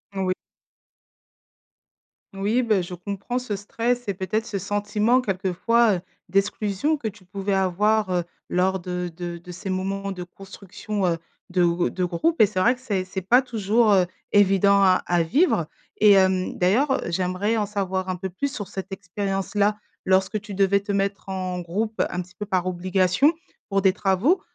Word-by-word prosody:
Oui. 185 -1 0 2.0
Oui, 205 +6 +1
bah, 215 -6 +2
je 175 +1 -8
comprends 200 +7 -4
ce 245 -5 -4
stress 235 +4 -2
et 200 - 0
peut-être, 190 +4 -2
ce 205 -4 -3
sentiment 210 +4 +1
quelquefois, 205 +2 +2
heu, 175 - -4 0.3
d'exclusion 200 - 0
que 280 -7 -4
tu 205 -2 -9
pouvais 195 +2 -2
avoir, 195 +2 +2
heu, 175 -1 +1 0.3
lors 185 +1 +1
de 180 0 -4
de 175 -1 -5
de 180 +1 -11
ces 185 +2 -5
moments 195 +1 -2
de 180 -2 -5
construction, 195 +2 -5
heu, 170 -1 +1 0.3
de 180 -1 +2
gr 170 +1 +1
de 185 - -1
groupes 190 - 0
et 215 - +8
c'est 195 -2 -3
vrai 240 +7 +4
que 250 - -20
c'est 200 -7 -1
c'est 185 0 -6
pas 245 +7 +5
toujours, 225 -2 +2
heu, 185 -2 +4 0.3
évident 200 0 +5
à 185 -1 +4
à 175 -1 +2
vivre. 175 - +2 0.3
Et 210 -1 +6
hem, 190 -1 +3
d'ailleurs, 225 +11 +2
heu, - - -4
j'aimerais 185 +5 0
en 210 - +1
savoir 190 -2 -2
un 185 - -1
peu 190 +2 -5
plus 270 +10 -3
sur 205 -7 -5
cette 195 0 -7
expérience-là. 200 +2 -1 0.3
Lorsque 190 +3 +2
tu 210 0 -9
devais 200 0 +3
te 205 - -4
mettre 200 0 -1
en 185 -1 -3
groupe, 215 +6 -3
un 180 - -2
petit 180 +1 -14
peu 210 - -5
par 185 -3 0
obligation, 185 - +2 0.4
pour 195 -1 +1
des 190 - +5
travaux, 205 - +2
195 Hz, 180 wpm, -24 LUFS, 185-210 Hz, 2.0 s, et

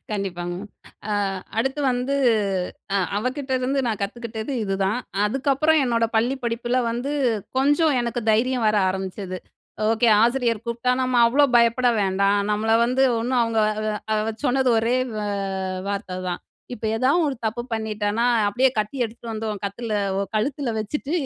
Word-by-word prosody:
கண்டிப்பாங்க 175 -4 -3
மேம். 210 - -9 0.4
அ - - 0 0.5
அடுத்து 270 +5 0
வந்து 250 +3 -1 0.8
அ - - +4 0.2
அவ 210 - -2
கிட்டருந்து 265 -1 -1
நான் 220 -3 -2
கத்துக்கிட்டது 225 +3 -4
இதுதான். 195 +3 0 0.3
அதுக்கப்புறம் 275 +7 +2
என்னோட 230 -2 +1
பள்ளி 240 +4 +2
படிப்புல 240 +2 0
வந்து 250 +5 -3 0.5
கொஞ்சம் 290 +2 +3
எனக்கு 240 0 -2
தைரியம் 240 +2 +1
வர 215 - +3
ஆரம்பிச்சது. 190 0 -4 0.5
ஓகே 230 +1 +2 0.2
ஆசிரியர் 235 -2 +1
கூப்ட்டா 235 +2 -1
நம்ம 255 -1 0
அவ்ளோ 275 +5 +4
பயப்பட 235 +2 +4
வேண்டாம். 200 +1 +2
நம்மள 215 +1 0
வந்து 255 +2 +1 0.2
ஒண்ணும் 245 +1 +1
அவங்க 230 -1 0 0.5
அ - - +3 0.3
சொன்னது 260 0 +2
ஒரே 235 +3 +1 0.2
வ - - -2 0.7
வார்த்ததான். 185 -3 -4 0.3
"இப்ப 220 - -10
ஏதா 255 +4 +2 0.2
ஒரு 280 - -1
தப்பு 230 +2 -1
பண்ணிட்டேனா 220 0 -1 0.2
அப்டியே 255 +5 +3
கத்தி 215 +6 -2
எடுத்துட்டு 230 +1 -7
வந்து 220 0 -3
உன் 205 -2 -6
கத்துல 215 +2 -3 0.2
உன் 200 - -3
கழுத்துல 255 +2 -1
வச்சுட்டு 290 +7 -4
230 Hz, 145 wpm, -23 LUFS, 210-255 Hz, 0.8 s, அ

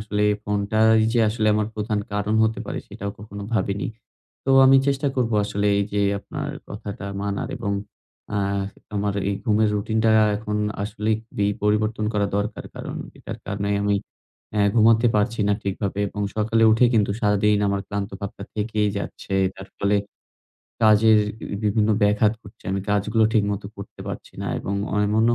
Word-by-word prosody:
আসলে 105 -1 -1 0.2
ফোনটাই 110 +2 +3
যে 120 - +2
আসলে 110 0 0
আমার 105 0 0
প্রধান 105 0 -1
কারণ 105 +1 0
হতে 110 0 -1
পারে, - - -3
সেটাও 100 +1 -5
কখনো 100 -1 -8
ভাবিনি। 100 +2 0 0.6
তো 135 - +1
আমি 135 +1 +7
চেষ্টা 140 0 +1
করব 120 -3 +1
আসলে 105 0 -1
এই 100 - +2
যে 105 - +1 0.2
আপনার - - -6 0.2
কথাটা 100 0 -6
মানার, 100 0 -2
এবং 100 - -2 0.6
আ - - +1 0.6
আমার 100 0 0
এই 100 - 0
ঘুমের 110 -2 +3
রুটিনটা 110 +2 +1 0.3
এখন 105 0 -3 0.3
আসলেই 105 +1 -1
খুবই 100 -2 -1
পরিবর্তন 105 +1 +1
করা 105 -1 +1
দরকার। 105 +1 -3
কারণ - - -6 0.2
এটার - - -7
কারণে 100 0 -2
আমি 100 0 +2 0.6
অ্যা 105 -1 +2
ঘুমাতে 115 +1 +5
পারছি 105 +2 +1
না - - +4
ঠিকভাবে, 100 0 -2
এবং 105 +1 -4
সকালে 115 +1 +2
উঠে 115 +3 +4
কিন্তু 105 -3 +3
সারাদিন 105 0 +3
আমার 100 0 0
ক্লান্তভাবটা 100 0 -5
থেকেই 105 0 0
যাচ্ছে। 100 - -5 0.2
তার 95 0 -10
ফলে 100 +1 +2 0.9
কাজের 110 0 +6 0.2
বি - - -8 0.2
বিভিন্ন 105 +1 +2
ব্যাঘাত 105 +1 +4
করছে। 100 - -16
আমি 95 - 0
কাজগুলো 105 +2 +2
ঠিকমতো 105 -2 0
করতে 100 - -10
পারছি - - -7
না। - - -4
এবং 100 - -3 0.2
এমন 105 +2 +2
ও 120 - +4
105 Hz, 160 wpm, -23 LUFS, 100-110 Hz, 0.9 s, আমি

